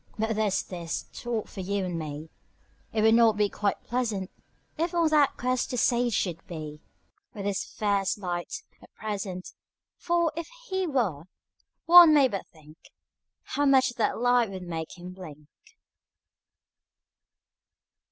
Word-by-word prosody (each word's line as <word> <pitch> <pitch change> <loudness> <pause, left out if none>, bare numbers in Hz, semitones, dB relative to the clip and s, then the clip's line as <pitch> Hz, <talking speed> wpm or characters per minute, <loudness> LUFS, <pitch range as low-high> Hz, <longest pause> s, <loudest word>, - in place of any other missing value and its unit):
But 220 0 -1
there's 210 -2 +1
this 170 -3 -5
thought 235 -3 -3
for - - -11
you 195 +1 -1
and 175 -2 -3
me: 155 0 -7 0.6
It 215 -1 0
would 220 0 +6
not 225 -2 +5
be 210 -1 +2
quite 200 -1 -2
pleasant 220 -6 -2 0.4
If 335 +2 -2
on 335 -2 +3
that 295 -3 +3
quest 255 0 -1
the 250 - -3
sage 240 -1 +2
should 170 -4 -2
be 155 -3 -7 0.5
With 200 -2 -5
his 200 -1 -1
fierce 200 -2 -1
light, 180 - -4 0.2
at - - -17
present. 195 -4 -5 0.4
For, 340 -2 +1
if 335 0 -5 0.2
he 380 -1 -1
were, 205 - -1 0.6
one 340 -2 +9
may 280 -3 +6
but 200 -6 -5
think 155 -1 -17 0.7
How 290 0 0
much 265 -1 +5
that 220 - +1
light 245 -1 +3
would 190 -1 -7
make 165 0 -6
him 180 +1 -9
blink. 155 -6 -11
210 Hz, 145 wpm, -27 LUFS, 180-255 Hz, 0.7 s, one